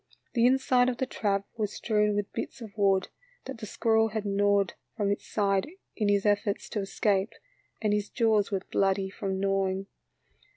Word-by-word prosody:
The 235 -1 +4
inside 255 -1 +3
of 245 - -3
the 260 - 0
trap 200 -5 -1
was 210 -2 -2
strewn 210 -2 +1
with 205 -1 -2
bits - - -5
of 220 -4 -10
wood 195 -2 +2 0.4
that 265 -3 -7
the 215 - -6
squirrel 225 +2 +2
had 215 -1 -4
gnawed 200 -1 +2 0.2
from 205 -2 +1
its 200 - -3
sides 200 +2 +1 0.3
in 210 -3 0
his 200 0 +2
efforts 205 -1 +1
to 215 - -2
escape, 195 +1 0 0.5
and 210 -1 +2
his 210 -1 -1
jaws 220 -4 +2
were 195 -2 -1
bloody 195 0 +1
from 190 -1 -3
gnawing. 195 0 0
205 Hz, 175 wpm, -28 LUFS, 195-220 Hz, 0.5 s, The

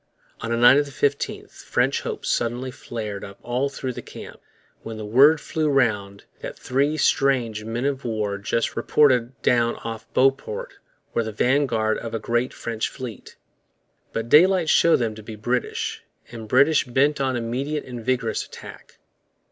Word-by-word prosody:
On 115 - -5
the 115 - 0
night 120 +3 +7
of 145 - -1
the - - -10
15th 140 +1 -2
French - - +1
hopes - - -5
suddenly 120 +2 -1
flared 110 -6 -6
up 100 0 -9
all 125 +3 -1
through 130 -2 -5
the - - -7
camp - - -11 0.4
when 115 -1 -7
the 110 - -6
word 140 +9 +6
flew 155 +1 -1
round 105 -8 0 0.2
that - - -7
three 140 +4 0
strange 125 -8 +1
men 115 +3 -3
of 140 -1 -1
war 105 -3 -2
just 115 +3 -1
reported 125 -4 +2
down 120 -1 +2
off 115 0 -7
Beauport 455 - 0 0.3
were 115 - +1
the 110 - -4
vanguard 115 -2 +1
of 115 -1 -5
a - - -2
great 120 +3 -1
French 115 -1 -3
fleet. 125 -7 -9 0.8
But 115 0 -3
daylight 175 +4 +5
showed 170 - +5
them 115 -3 -1
to 110 - -10
be 110 +1 -9
British, 120 +4 -2 0.3
and 115 -2 -8
British 140 +6 +4
bent 140 +4 +1
on 130 -1 0
immediate 130 +6 -3
and 120 -2 -7
vigorous 120 -2 0
attack. - - -12
120 Hz, 165 wpm, -23 LUFS, 115-140 Hz, 0.8 s, night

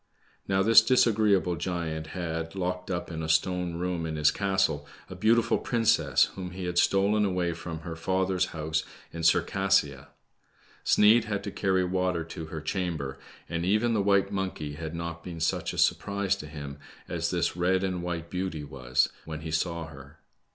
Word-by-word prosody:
Now 95 0 +2
this 115 +2 +8
disagreeable 110 -6 +3
giant 80 -2 -3
had, 80 0 -4
locked 90 -1 -3
up 90 -2 -3
in 80 -1 -4
a 80 - -4
stone 90 +2 +1
room 85 -1 -2
in 80 - -4
his 75 -1 +4
castle, 95 -7 0 0.2
a - - -6
beautiful 115 +1 +3
princess 85 - +3
whom 90 -2 -6
he 95 0 -5
had 90 0 +1
stolen 100 +3 +3
away 90 -3 0
from 80 -1 -7
her 85 -1 -6
father's 95 +2 0
house 80 0 -2 0.3
in 85 - -5
Circassia. 85 -4 +2 0.8
Sneid 110 +2 +5
had 100 -3 -3
to - - -4
carry 95 -2 +1
water 90 -2 0
to 80 0 -7
her 80 -1 -6
chamber, 80 -6 -3 0.3
and 85 0 -3
even 110 +6 +2
the 105 - +2
white 100 0 +2
monkey 95 -7 -3
had 80 +2 -6
npt 85 0 -5
been 85 -1 -7
such 80 - 0
a - - -8
surprise 100 -1 +1
to 75 - -8
him, 70 -2 -8 0.3
as - - -2
this - - 0
red 90 +2 +1
and 90 -2 -1
white^ 85 -1 -4
beauty 90 -4 -3
was 65 -4 0 0.2
when 80 -1 -6
he 80 0 -5
saw 85 +1 -1
her. 70 -1 -13
90 Hz, 175 wpm, -28 LUFS, 80-95 Hz, 0.8 s, this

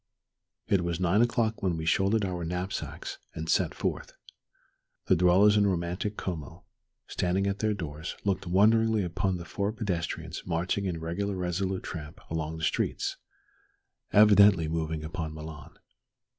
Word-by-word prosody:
It 100 -3 +3
was 85 0 -2
nine 95 +4 +3
o'clock 115 -2 +1
when 90 -4 0
we 80 - -4
shouldered 100 +5 +2
our 90 -2 -3
knapsacks 90 +3 -4 0.2
and 80 0 -5
set - - +1
forth. - - -3 0.9
The - - +4
dwellers 95 +5 +5
in 100 -1 +4
romantic 90 +3 -2
Como, 80 -6 -5 0.4
standing 90 +2 0
at 100 0 -1
their 110 -1 +1
doors, 80 -3 -6
looked 95 -2 0
wonderingly 110 +3 +4
upon 95 +1 -1
the 85 - -8
four 100 +5 -2
pedestrians 85 -7 -3
marching 90 +3 -1
in 90 -3 -2
regular 95 +5 -2
resolute 95 +1 -2
tramp 75 -3 -7
along 80 0 -3
the 80 - -7
streets, - - -1 0.9
evidently 100 -5 +6
moving 80 -1 -2
upon 80 -1 -5
Milan. 75 -2 -9
90 Hz, 145 wpm, -28 LUFS, 80-100 Hz, 0.9 s, evidently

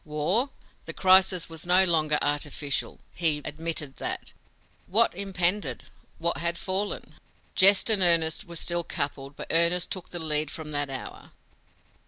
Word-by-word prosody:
War! 160 - -1 0.4
The - - -7
crisis 185 -1 +3
was 165 +1 -8
no 180 +2 +5
longer 155 -4 +2
"artificial" 145 -1 -3
he 160 -4 +2
admitted 150 -2 -3
that! - - -5 0.5
What 225 +5 +2
impended, 180 - -2 0.3
what 170 +1 -2
had 170 0 -2
fallen? 195 +3 -4 0.3
Jest 195 0 +7
and 215 -4 +4
earnest 170 +1 +3
were 170 -1 -11
still 170 +1 -1
coupled, 140 -2 -5
but - - -9
earnest 170 +2 +2
took 185 -3 -6
the 175 - -7
lead 155 -2 0
from 155 -1 -8
that 145 -1 -2
hour. 130 -1 -9
170 Hz, 145 wpm, -26 LUFS, 150-185 Hz, 0.5 s, Jest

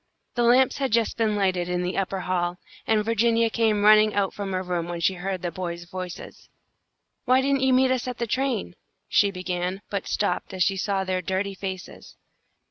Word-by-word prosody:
The 240 - -1
lamps 245 +3 +4
had 270 -3 -1
just 230 0 +2
been 220 -2 +1
lighted 185 -3 0
in 180 0 -1
the 180 +1 -2
upper 195 0 -2
hall, 180 -1 -1 0.3
and 215 -1 +2
Virginia 230 0 +2
came 220 -3 +1
running 215 0 +6
out 200 -2 +1
from 200 -1 -5
her 185 0 -1
room 175 -2 -2
when 175 -1 -4
she 180 +3 +2
heard 185 0 -4
the 175 - -2
boys' 175 -1 -5
voices. 180 0 -8 0.8
"Why 255 0 +4
didn't 275 0 +1
you 265 0 +3
meet 255 0 +4
us 255 -1 -1
at 250 -1 -4
the 235 - -1
train?" 245 -6 -1 0.3
she 200 - +3
began, 185 0 -3
but 200 -2 -3
stopped 190 -1 -1
as 185 - +2
she 195 - +1
saw 195 0 -1
their 185 -1 -1
dirty 190 +2 -2
faces. 190 -1 -7
195 Hz, 200 wpm, -25 LUFS, 180-230 Hz, 0.8 s, running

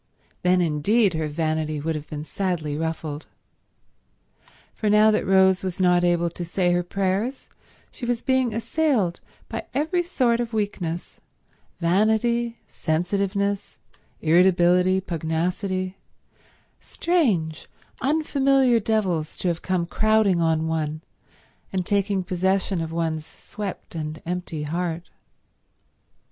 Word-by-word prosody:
Then 180 0 +3
indeed 180 +6 +2
her 160 -1 -1
vanity 155 0 -1
would 160 +3 -1
have 155 -1 -6
been 150 -1 -5
sadly 160 -4 -2
ruffled. 160 -1 -4 1.5
For 215 - -1
now 210 +1 +6
that 215 - 0
Rose 190 -1 +4
was 185 -1 -3
not 180 -1 +4
able 175 -1 +2
to 175 - -6
say 175 +1 +1
her 175 0 +2
prayers 195 +8 -2 0.4
she 240 - -7
was 240 -1 -1
being 260 -2 +2
assailed 230 - 0 0.3
by - - -5
every 320 +5 +1
sort 255 -9 +1
of 235 -1 -3
weakness: 180 -6 -3 0.6
vanity, 220 +6 +2
sensitiveness, 200 +4 -1 0.4
irritability, 180 +2 +4
pugnacity 180 +3 -2 0.8
—strange, 205 - 0 0.3
unfamiliar 275 -4 +3
devils 190 -8 -1
to 180 - 0
have 170 -1 -2
coming 185 -2 0
crowding 215 -2 +2
on 160 -1 +2
one 155 -1 -2 0.7
and 185 -2 -1
taking 200 -1 +1
possession 190 0 0
of 165 0 -4
one's 165 -2 -1
swept 195 +5 -8
and 155 -1 -5
empty 175 -3 -3
heart. 170 +2 -3
185 Hz, 115 wpm, -24 LUFS, 165-215 Hz, 1.5 s, now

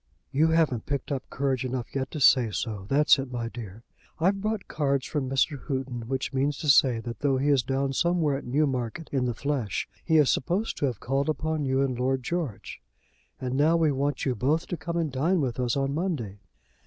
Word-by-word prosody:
"You 155 +4 +3
haven't 160 -8 +1
picked 140 0 -3
up 135 -2 -3
courage 135 -2 -1
enough 125 -1 -4
yet 135 -1 -2
to 155 - -5
say 125 -4 +5
so; 105 -2 -4
that's 150 +1 +5
it, 135 -1 -5
my 120 -2 -3
dear. 115 -2 -9 0.4
I've 195 +4 +2
brought 215 -1 -2
cards 140 -3 0
from 140 -4 -2
Mr. 135 +2 +1
Houghton, 130 -5 -3
which 135 +1 -2
means 135 +1 0
to 150 - -2
say 130 -4 +5
that 115 0 -7
though 140 -2 +2
he 140 +3 +1
is 140 -3 +4
down 135 +2 -1
somewhere 165 -2 +1
at 135 - -5
Newmarket 130 0 -1
in 130 -3 +1
the 120 -2 -1
flesh 140 -8 -2 0.2
he 160 -1 +3
is 150 -3 +5
to - - +1
be - - -11
supposed 185 - -2
to - - 0
have 120 -6 -4
called 135 +4 -1
upon 155 -1 -1
you 130 0 +1
and 130 -3 -2
Lord 130 0 0
George. 155 - -4 0.6
And 130 -1 -3
now 155 +5 +3
we 160 -3 +3
want 140 0 -1
you 130 - +1
both 140 +8 0
to - - -1
come 170 0 -4
and 160 -3 0
dine 160 +8 +1
with 130 -4 -2
us 125 +1 0
on 135 0 0
Monday. 145 - -3
135 Hz, 220 wpm, -27 LUFS, 125-150 Hz, 0.6 s, say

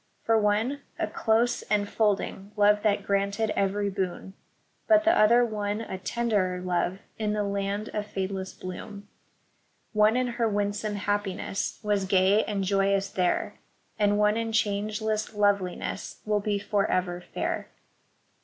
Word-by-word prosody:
For 225 - +3
one 220 +6 +1 0.2
a - - 0
close, 230 +2 +1
enfolding 205 -1 0
love 210 0 +4
that 205 -2 +1
granted 200 +2 0
every 200 +1 0
boon; 190 0 -4 0.5
But 320 -1 +5
the 335 +2 +4
other 235 +3 +5
won 210 -1 -2
a 190 -4 -6
tenderer 195 -3 0
love 180 0 -1 0.2
in 210 -1 0
the 210 -1 0
land 200 +1 -2
of 210 -1 -4
fade 195 -2 -3
less 190 -1 -4
bloom; 200 +2 -8 0.9
One 215 +2 +4
in 255 - +2
her 235 -2 0
winsome 205 +1 -1
happiness 205 -1 -2
was 205 -2 +1
gay 190 +2 +4
and 200 -2 -2
joyous 195 0 +1
there, 180 -1 0 0.4
And 205 0 +3
one 210 +1 +3
in 230 0 -2
changeless 215 0 -1
loveliness 200 -3 -1
will 210 -1 +1
be 205 0 -1
forever 185 -3 0
fair. - - -3
205 Hz, 140 wpm, -27 LUFS, 195-215 Hz, 0.9 s, But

